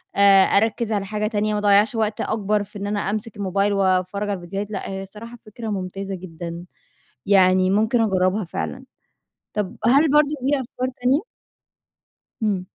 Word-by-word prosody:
آآ، 195 -1 +7
أركِّز 220 +3 +1
على 205 -2 -1
حاجة 210 +1 -2
تانية، 210 -1 -1
ما 210 - 0
أضيّعش 205 +4 +4
وقت 215 -1 -1
أكبر 210 -1 0
في 205 0 -11
إن 200 - -4
أنا 205 0 -1
أمسك 210 +2 -3
الموبايل 200 +1 0
واتفرَّج 190 +1 0
على 200 - -1
الفيديوهات، 195 +4 -5
لأ 195 - -4
هي 195 0 -4
الصراحة 220 +5 -10
فكرة 220 +2 -8
ممتازة 195 0 -4
جدًا، 170 -1 -8 0.6
يعني 185 -1 +4
ممكن 220 +4 +2
اجربها 190 -1 +1
فعلًا، 260 +9 -5 0.7
طب 205 -3 -3
هل 280 +5 +5
برضه 295 0 +5
في 275 +3 +1
أفكار 255 +1 -4
تانية؟ 270 - +2 1.2
إمم. 200 -4 0
205 Hz, 160 wpm, -22 LUFS, 195-220 Hz, 1.2 s, آآ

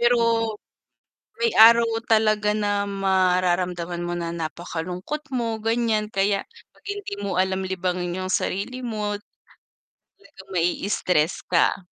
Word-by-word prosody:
pero 240 +1 +4 1.2
may 465 -1 +1
araw 230 +1 +8 0.2
talaga 215 -1 +3
na 205 -1 0
mararamdaman 180 -2 +1
mo 175 0 -3
na 170 -1 -3
napakalungkot 175 - -5
mo, 230 -4 -2
ganiyan 225 -2 0
kaya 195 0 +1 0.3
'pag - - -26
hindi 405 - -5
mo 195 -3 -2
alam 190 0 +1
libangin 180 -1 -2
yung 185 - -2
sarili 250 +7 -2
mo, 215 -3 -2 1.0
talagang 285 - -17
mai-stress 175 -2 0
ka. 170 - +2
195 Hz, 115 wpm, -24 LUFS, 180-220 Hz, 1.2 s, araw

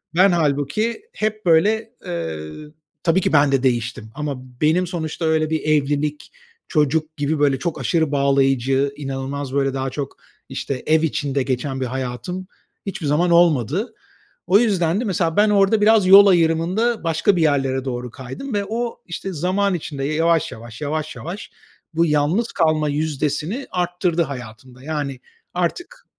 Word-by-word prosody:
Ben 190 +3 +6
hâlbuki 160 - 0
hep 215 -1 -3
böyle, 215 +7 +3
eee 80 - -4 0.6
Tabii 175 +3 +3
ki - - 0
ben 145 -1 +5
de 135 -1 +1
değiştim 120 -3 -1
ama 150 -2 -3 0.3
benim 170 +4 +3
sonuçta 165 -1 -4
öyle 160 -1 +2
bir 160 -1 -1
evlilik, 150 0 0 0.4
çocuk 155 0 0
gibi, 145 +1 -1
böyle, 140 -2 +2
çok 155 -2 -3
aşırı 160 +4 +1
bağlayıcı, 135 -1 +2
inanılmaz 135 -1 -5
böyle 135 -1 +1
daha 135 0 -2
çok, 140 +1 -6 0.3
işte, 135 -2 -4
ev 160 0 +3
içinde 140 -3 -1
geçen 130 +1 -2
bir - - 0
hayatım 130 +9 -4 0.4
hiçbir 190 -5 -5
zaman 170 +4 +2
olmadı. 170 - +3 0.5
O 195 +4 +6
yüzden 190 -5 +1
de - - -2
mesela 170 -4 0
ben 210 0 +5
orada 205 +1 +3
biraz 210 -3 +5
yol 200 +1 +9
ayrımında 180 +6 +2
başka 165 +4 +2
bir 170 - +1
yerlere 135 -3 +1
doğru 125 -2 -4
kaydım 135 - -7
ve 200 -1 0
o, 235 +1 -3
işte, 185 +2 -5
zaman 185 +5 0
içinde 145 -5 -4
yavaş 165 +1 +1
yavaş, 115 +1 -10
yavaş 155 +1 -3
yavaş 180 +6 -7 0.4
bu 165 +1 +3
yalnız 155 +10 +1
kalma 155 -2 +1
yüzdesini 150 - -2
arttırdı 175 -1 0
hayatımda. 125 -1 -9
Yani 145 -4 -3 0.3
artık 350 - -3
155 Hz, 150 wpm, -21 LUFS, 140-180 Hz, 0.6 s, yol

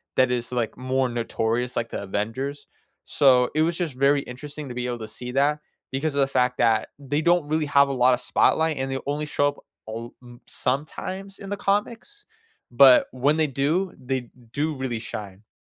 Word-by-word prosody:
that 130 -1 +3
is, 120 -1 -2
like, 120 -3 -2
more 130 0 0
notorious 120 +1 -1
like 115 - -2
the - - -4
Avengers. 130 +9 -4 0.4
So, 125 -4 +4
it 155 - +3
was 165 +1 0
just 170 -7 -2
very 140 +2 +3
interesting 145 +3 -8
to 125 - -5
be 125 0 -2
able 120 -1 -3
to 110 - -6
see 125 0 -5
that 145 +3 +2 0.3
because 140 +2 -2
of 140 - +2
the 135 - +3
fact 125 -1 +1
that 115 -2 +2
they 145 +2 -1
don't 175 -1 +3
really 155 0 0
have 140 -1 +5
a 135 - -1
lot 125 0 +4
of 125 - 0
spotlight 160 -1 +2
and 135 0 -2
they 135 - -2
only 145 +1 -2
show 145 -1 +1
up 145 - -3 0.3
all 115 +2 -7
m 120 -1 -14
sometimes 185 +8 -4
in 195 - -8
the 205 - -1
comics. 225 - -2 0.5
But 130 +1 +7
when 140 +5 +1
they 155 - +2
do, 150 +8 0
they 130 -2 -4 0.2
do 150 +3 -1
really 130 -4 -3
shine. 105 -2 -8
135 Hz, 200 wpm, -24 LUFS, 125-150 Hz, 0.5 s, But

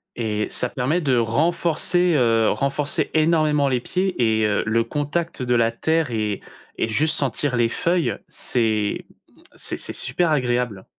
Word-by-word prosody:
et 105 -2 -2
ça 125 - +1
permet 140 +9 -1
de 135 -5 +1
renforcer, 170 +7 +1
heu, 115 -4 +3
renforcer 140 +1 -1
énormément 155 -3 +2
les 125 -2 +1
pieds 185 +2 -2 0.2
et 110 - +2
heu, 105 -1 0
le 115 +1 +1
contact 150 +5 -3
de 125 -1 +1
la 115 -1 +2
terre 160 +3 0
et 105 -3 -2 0.4
et - - +2
juste 150 +9 +2
sentir 135 -1 0
les 120 -1 +3
feuilles, 170 +7 0
c'est 110 -4 0 0.5
c'est - - -2
c'est - - -2
super 160 +6 0
agréable. 120 -7 -1
130 Hz, 155 wpm, -22 LUFS, 115-155 Hz, 0.5 s, heu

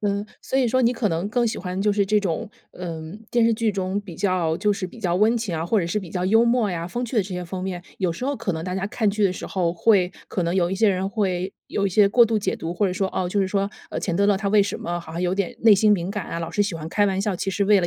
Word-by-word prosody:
嗯， 200 0 -1 0.2
所 265 - -3
以 255 -3 +3
说 255 +2 +2
你 240 0 +4
可 230 -3 0
能 170 +3 -1
更 240 +3 +1
喜 220 - -2
欢 180 +1 -4
就 210 0 +3
是 200 -1 +1
这 210 +1 +3
种， 185 -3 -2 0.2
嗯， 170 +2 -7
电 240 -1 +4
视 230 - +4
剧 220 -1 0
中 190 +1 -2
比 195 -4 -10
较 175 -4 +1
就 210 +1 +2
是 195 -2 -3
比 205 +6 -13
较 180 -4 0
温 220 +5 +3
情 220 -6 -3
啊， 160 - -2
或 215 +3 +2
者 170 - -2
是 170 +5 -1
比 190 -4 -7
较 180 0 -2
幽 225 +4 +4
默 235 -3 +2
呀、 170 -1 -3
风 240 +8 -3
趣 245 +1 -5
的 215 - +4
这 190 - -9
些 180 0 -4
方面。 185 0 -5 0.2
有 180 -4 0
时 250 - -6
候 280 +1 -1
可 190 - -2
能 160 0 -4
大 180 0 -3
家 190 0 -1
看 215 0 0
剧 210 0 0
的 185 - +3
时 185 - -7
候， 175 -3 0
会 185 0 +3 0.2
可 185 - -1
能 170 +1 0
有 175 -2 +2
一 190 - 0
些 215 +2 +3
人 190 0 0
会 190 -3 -1
有 200 - -1
一 - - -2
些 200 +2 +5
过 235 +3 +6
度 225 -1 +1
解 195 -2 -1
读。 165 - -6
或 200 +3 +1
者 185 - -1
说， 190 +1 -1
哦， 185 - -1
就 200 +3 0
是 190 - +1
说， 200 +1 0 0.2
呃， - - -3
钱 175 - -2
德 200 +3 +2
勒 205 -1 +4
他 200 +1 -2
为 210 -1 +5
什 200 - -3
么 175 0 -3
好 165 - -11
像 170 - -4
有 180 0 +1
点 195 -2 -2
内 225 -2 +7
心 210 +2 +4
敏 180 -3 0
感 210 -4 -4
啊， - - -3
老 165 -1 -4
是 205 - +1
喜 200 -4 -2
欢 160 0 -6
开 205 +4 +2
玩 190 -1 0
笑， 205 -1 0
其 190 +2 -2
实 200 +1 0
为 205 0 +5
了 175 - 0
195 Hz, 355 characters per minute, -23 LUFS, 180-210 Hz, 0.2 s, 内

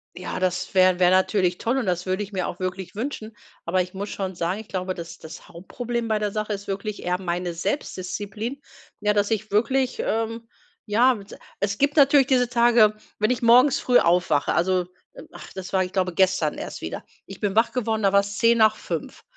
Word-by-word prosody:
Ja 180 - -5
das 185 0 -1
wär 185 -1 +4
wäre 180 0 +5
natürlich 185 -1 +2
toll 240 +4 0
und 260 - -1
das 180 0 -1
würde 185 +2 -1
ich 205 - -10
mir 185 -2 -1
auch 175 - -6
wirklich 185 +1 -5
wünschen, 225 -2 -5 0.3
aber 185 +2 +1
ich 180 +1 -12
muss 200 +2 -5
schon 190 -1 -4
sagen, 175 +3 -2
ich 220 - -10
glaube, 185 0 -3
das 170 -1 -9
das 160 +1 -11
Hauptproblem 235 +7 -5
bei 220 -1 +1
der 210 -1 -2
Sache 215 0 -3
ist 200 0 -5
wirklich 200 +2 -4
eher 180 +1 -1
meine 175 -1 -2
Selbstdisziplin. 205 - -4 0.4
Ja, 210 0 +2
dass 205 -1 +1
ich 215 -1 -2
wirklich, 255 +5 +1
ähm, 225 +1 -2 0.4
ja 245 +5 +4
s 200 0 -12 0.2
es 200 0 -1
gibt 285 +3 +1
natürlich 280 -2 +6
diese 250 -3 +2
Tage, 235 -3 +4 0.2
wenn 215 - +2
ich 250 -1 -1
morgens 250 +4 +6
früh 250 -1 +4
aufwache, 170 -4 +2
also 180 0 +1 0.4
ach - - -12
das 190 -1 -8
war, 190 -1 +3
ich 180 - -7
glaube, 185 -2 0
gestern 185 0 +2
erst - - -7
wieder. - - -6 0.2
Ich - - -10
bin 205 -1 -1
wach 225 +1 +3
geworden, 225 -3 -1
da 195 -2 +3
war's 200 0 +1
5:10, 215 -8 +1
200 Hz, 200 wpm, -24 LUFS, 185-230 Hz, 0.4 s, natürlich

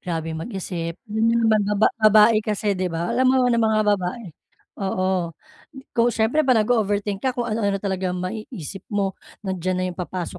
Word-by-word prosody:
grabe 165 -2 -3
mag-isip. 170 -1 -5
Hmm, 225 +1 +1
ba-ba 210 0 +2
babae 215 +1 +6
kasi 210 -1 -1
'di 185 -1 -1
ba? 170 0 -2
Alam 255 0 +3
mo 260 - +4 0.2
na 235 - +2
mga 220 -1 +2
babae 205 +2 -1 0.5
oo. 185 -3 -1 0.6
Kung 235 0 +3
siyempre 225 +7 +2
pa 255 - +5
nag-o-overthink 210 -3 +1
ka, 260 -1 -1
kung 245 - -1
ano-ano 205 -3 -1
talaga 190 -2 -2
maiisip 190 - -6
mo. 200 -2 -1 0.3
Nandiyan 185 -1 -2
na 185 - 0
'yong 180 - -12
papasok 180 -1 -5
200 Hz, 160 wpm, -23 LUFS, 185-220 Hz, 0.6 s, babae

